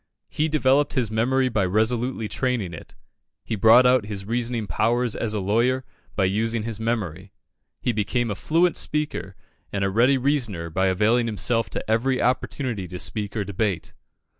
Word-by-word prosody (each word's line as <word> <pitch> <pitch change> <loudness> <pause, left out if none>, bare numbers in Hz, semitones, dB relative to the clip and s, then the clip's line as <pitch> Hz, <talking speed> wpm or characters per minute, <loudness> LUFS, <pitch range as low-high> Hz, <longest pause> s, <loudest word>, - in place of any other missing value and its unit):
He 155 - 0
developed 145 -1 +2
his 120 -6 0
memory 130 +4 +2
by 110 -5 0
resolutely 110 +4 0
training 120 -8 -2
it 80 - -11 0.5
he 110 - -3
brought 115 +5 +6
out 125 -4 +3
his 100 -2 -5
reasoning 120 0 -2
powers 115 +5 0
as 110 -2 -2
a - - 0
lawyer 120 +7 +1 0.3
by 95 - +2
using 110 +3 0
his 110 -1 -4
memory 100 -5 -3 0.5
he 125 - 0
became 115 +2 -1
a - - -2
fluent 165 - +2
speaker 150 -10 -2 0.4
and 100 -1 -1
a 95 - 0
ready 125 +6 +4
reasoner 120 - -1
by 95 +4 +1
availing 110 +6 +2
himself 115 +1 +1
of - - -2
every 125 +4 +1
opportunity 125 -4 -1
to 90 - -7
speak 105 +2 -2
or 105 - 0
debate. 100 -3 -2
115 Hz, 165 wpm, -24 LUFS, 100-125 Hz, 0.5 s, brought